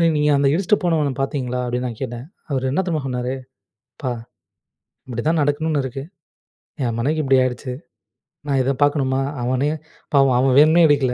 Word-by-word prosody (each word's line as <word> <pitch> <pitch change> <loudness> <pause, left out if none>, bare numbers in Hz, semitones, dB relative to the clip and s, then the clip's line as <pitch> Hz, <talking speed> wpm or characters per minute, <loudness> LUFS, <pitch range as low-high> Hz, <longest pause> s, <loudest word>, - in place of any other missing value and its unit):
"நீ 170 - +5
நீங்க 150 0 +2
அந்த 140 0 +3
இடிச்சுட்டு 195 +4 +2
போனவன 155 -5 +1
பார்த்தீங்களா." 130 -3 -2
அப்படீன்னு 125 +1 -2
நான் 115 -2 -8
கேட்டேன். 120 +2 -5 0.2
அவர் 130 -1 0
என்ன 190 - +1
தெரியுமா 160 -3 0
சொன்னாரு. 125 0 -2 0.6
"அப்பா! 130 -3 -3 1.0
இப்படிதான் 155 +6 0
நடக்கணும்னு 145 0 0
இருக்கு. 135 +1 -5 0.8
என் 115 -2 -1
மனைக்கு 155 +5 0
இப்படி 135 -1 +4
ஆயிருச்சு. 125 0 -2 0.8
நான் 135 -2 +1
இதை 135 - +1
பார்க்கணுமா. 135 -2 +1 0.2
அவனே 130 +4 +1 0.4
பாவம். 135 -2 +5
அவன் 130 0 +3
வேணும்னே 160 +3 +6
இடிக்கல. 140 -4 +2
135 Hz, 155 wpm, -21 LUFS, 125-150 Hz, 1.0 s, வேணும்னே